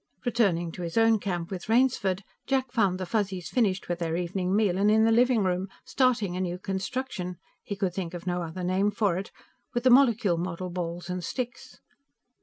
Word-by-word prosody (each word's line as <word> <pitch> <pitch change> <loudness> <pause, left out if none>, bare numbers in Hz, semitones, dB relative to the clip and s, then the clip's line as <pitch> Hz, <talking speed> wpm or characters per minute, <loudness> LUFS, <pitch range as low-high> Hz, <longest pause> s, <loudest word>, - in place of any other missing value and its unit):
Returning 195 -8 +1
to 180 - -8
his 170 +2 -4
own 225 -1 +5
camp 175 -3 -3
with 190 +2 -6
Rainsford, 225 -6 +2 0.2
Jack 265 -2 0
found 200 -7 +2
the 185 - -3
Fuzzies 190 -2 -2
finished 200 -6 +1
with 175 0 -2
their 165 -1 -1
evening 180 +2 -1
meal 200 -4 +2
and 205 +1 +4
in 220 +1 +5
the 225 - +4
living 240 -1 +4
room, 185 +1 0 0.2
starting 230 -9 +1
a 185 - -2
new 180 -1 -2
construction 190 -1 -4 0.2
he 200 - -5
could 195 -3 -1
think 180 -2 -4
of 175 - -8
no 180 -1 -1
other 170 +2 -5
name 185 +3 +2
for 205 -4 +1
it 195 - -7 0.5
with 240 - 0
the 255 - +5
molecule 230 -9 +4
model 180 +1 -4
balls 175 0 -4
and 180 -1 -3
sticks. 245 +3 -5
190 Hz, 200 wpm, -27 LUFS, 180-225 Hz, 0.5 s, own